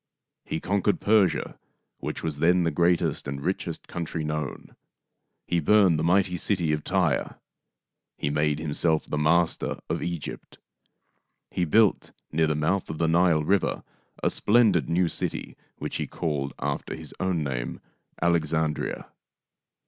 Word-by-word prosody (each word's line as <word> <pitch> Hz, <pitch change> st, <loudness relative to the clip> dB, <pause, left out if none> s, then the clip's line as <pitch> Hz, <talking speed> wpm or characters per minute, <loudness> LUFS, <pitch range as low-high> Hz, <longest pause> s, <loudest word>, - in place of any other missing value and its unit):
He -, -, -3 dB
conquered 100 Hz, +1 st, +1 dB
Persia, 105 Hz, -3 st, +2 dB, 0.4 s
which -, -, -5 dB
was 75 Hz, -3 st, -3 dB
then 90 Hz, +3 st, +4 dB
the 85 Hz, -, +1 dB
great 85 Hz, +3 st, +3 dB
est -, -, -2 dB
and 70 Hz, -, -4 dB
richest -, -, -3 dB
country 85 Hz, -2 st, -4 dB
known. 75 Hz, -2 st, -4 dB, 0.7 s
He 85 Hz, -, +1 dB
burned 95 Hz, -1 st, +4 dB
the -, -, -1 dB
mighty 90 Hz, +1 st, +2 dB
city 85 Hz, -3 st, 0 dB
of 75 Hz, -1 st, -2 dB
Tyre. 90 Hz, -7 st, 0 dB, 0.8 s
He 70 Hz, -, -1 dB
made 75 Hz, 0 st, +1 dB
himself 80 Hz, +1 st, +1 dB
the 75 Hz, -, -2 dB
master 80 Hz, +2 st, +2 dB
of -, -, -1 dB
Egypt. 85 Hz, -3 st, -5 dB, 0.9 s
He 90 Hz, -, 0 dB
built, 105 Hz, +5 st, +3 dB, 0.2 s
near 80 Hz, +1 st, +2 dB
the 75 Hz, -, 0 dB
mouth 80 Hz, +6 st, 0 dB
of 80 Hz, -, -4 dB
the 80 Hz, -, +1 dB
Nile 85 Hz, -1 st, +3 dB
River, 95 Hz, +4 st, +1 dB, 0.4 s
a -, -, +3 dB
splendid 105 Hz, -, +3 dB
new 85 Hz, +1 st, +2 dB
city -, -, -4 dB, 0.2 s
which -, -, -4 dB
he -, -, -3 dB
called, 70 Hz, -4 st, -3 dB
after -, -, -3 dB
his -, -, -9 dB
own 95 Hz, -4 st, 0 dB
name, 60 Hz, -3 st, -3 dB, 0.4 s
Alexandria. 80 Hz, -2 st, 0 dB
85 Hz, 145 wpm, -26 LUFS, 75-90 Hz, 0.9 s, then